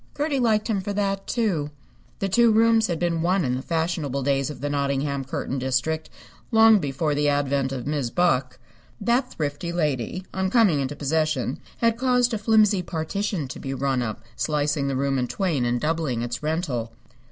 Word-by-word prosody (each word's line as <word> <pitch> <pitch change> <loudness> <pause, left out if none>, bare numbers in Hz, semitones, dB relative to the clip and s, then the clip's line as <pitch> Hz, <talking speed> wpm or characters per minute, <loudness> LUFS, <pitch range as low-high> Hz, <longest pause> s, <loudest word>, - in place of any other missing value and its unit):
Gertie 290 -1 0
liked 220 -3 +2
him 210 -4 0
for 205 +2 -4
that, 195 -1 -1
too. 190 -12 0 0.5
The 195 - -1
two 230 +4 +4
rooms 225 0 +4
had 170 - -1
been 170 -1 0
one 180 0 +2
in 125 - 0
the 130 - -3
fashionable 160 -4 -1
days 135 +1 +1
of 145 -4 -7
the 145 - -3
Nottingham 140 -1 -1
curtain 135 0 -3
district, 130 +5 -1 0.4
long 225 -2 +6
before 145 0 -1
the 145 0 +2
advent 140 -1 0
of 130 -3 -4
Mis' 145 -4 -1
Buck. 135 -5 +1 0.4
That 240 +5 +1
thrifty 150 +2 -3
lady, 155 +1 -2
on 190 0 0
coming 200 - +4
into 135 +1 -2
possession, 150 -3 -1 0.2
had 230 0 +1
caused 250 -1 +2
a 220 - -1
flimsy 210 -2 +4
partition 175 0 -3
to - - -7
be 135 0 -4
run 135 -1 0
up, 110 -2 -4
slicing 145 -1 0
the 135 - -1
room 135 0 0
in 125 - -1
twain 160 - -1
and 120 0 0
doubling 150 -6 -1
its 120 0 -4
rental. 150 -8 -2
155 Hz, 185 wpm, -24 LUFS, 135-195 Hz, 0.5 s, long